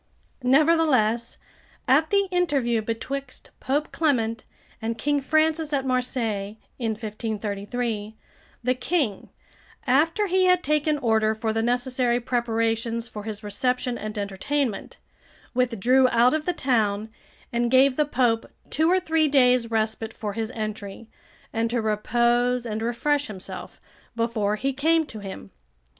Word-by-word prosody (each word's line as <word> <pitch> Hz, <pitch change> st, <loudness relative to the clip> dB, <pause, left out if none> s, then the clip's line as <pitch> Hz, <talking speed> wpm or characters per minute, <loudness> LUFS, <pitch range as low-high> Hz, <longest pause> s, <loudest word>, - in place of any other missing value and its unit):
Nevertheless, 255 Hz, -5 st, +3 dB, 0.5 s
at 305 Hz, +4 st, +4 dB
the 400 Hz, -1 st, +3 dB
interview 280 Hz, -11 st, +1 dB
betwixt 250 Hz, +4 st, -5 dB
Pope 290 Hz, +3 st, -1 dB
Clement 230 Hz, -8 st, 0 dB, 0.4 s
and 225 Hz, +1 st, -2 dB
King 290 Hz, +4 st, 0 dB
Francis 310 Hz, +1 st, +1 dB
at 270 Hz, -2 st, 0 dB
Marseilles, 230 Hz, -5 st, -1 dB, 0.2 s
[in 225 Hz, -3 st, 0 dB
1533.] 215 Hz, 0 st, -4 dB, 0.5 s
the 250 Hz, +1 st, +2 dB
King, 250 Hz, -, -1 dB, 0.6 s
after 325 Hz, +10 st, +3 dB
he 375 Hz, -1 st, +2 dB
had 365 Hz, -1 st, +4 dB
taken 300 Hz, 0 st, +1 dB
order 220 Hz, -4 st, +2 dB
for 220 Hz, 0 st, -2 dB
the 225 Hz, -, 0 dB
necessary 245 Hz, +1 st, +1 dB
preparations 230 Hz, -1 st, -1 dB
for 210 Hz, -2 st, -8 dB
his 215 Hz, -1 st, -5 dB
reception 250 Hz, +4 st, -1 dB
and 215 Hz, 0 st, -5 dB
entertainment, 205 Hz, +5 st, -2 dB, 0.6 s
withdrew 250 Hz, +1 st, +3 dB
out 235 Hz, +2 st, +4 dB
of 310 Hz, +1 st, -2 dB
the 360 Hz, -, +2 dB
town, 220 Hz, -7 st, 0 dB, 0.4 s
and 235 Hz, 0 st, +1 dB
gave 260 Hz, +1 st, +5 dB
the 300 Hz, -, +3 dB
Pope 245 Hz, -5 st, +1 dB, 0.2 s
two 315 Hz, +3 st, +2 dB
or 370 Hz, +1 st, +4 dB
three 320 Hz, -3 st, +2 dB
days' 250 Hz, -4 st, +4 dB
respite 220 Hz, 0 st, -1 dB
for 210 Hz, -2 st, -4 dB
his 225 Hz, 0 st, -3 dB
entry, 215 Hz, 0 st, -6 dB, 0.4 s
and 230 Hz, 0 st, 0 dB
to 240 Hz, +1 st, 0 dB
repose 240 Hz, +3 st, +1 dB
and 220 Hz, -1 st, -3 dB
refresh 285 Hz, +5 st, 0 dB
himself, 195 Hz, -4 st, -8 dB, 0.4 s
before 230 Hz, -3 st, 0 dB
he 270 Hz, +5 st, -1 dB
came 320 Hz, +4 st, +2 dB
to 220 Hz, -, -9 dB
him. 195 Hz, -, -8 dB
240 Hz, 135 wpm, -25 LUFS, 220-280 Hz, 0.6 s, gave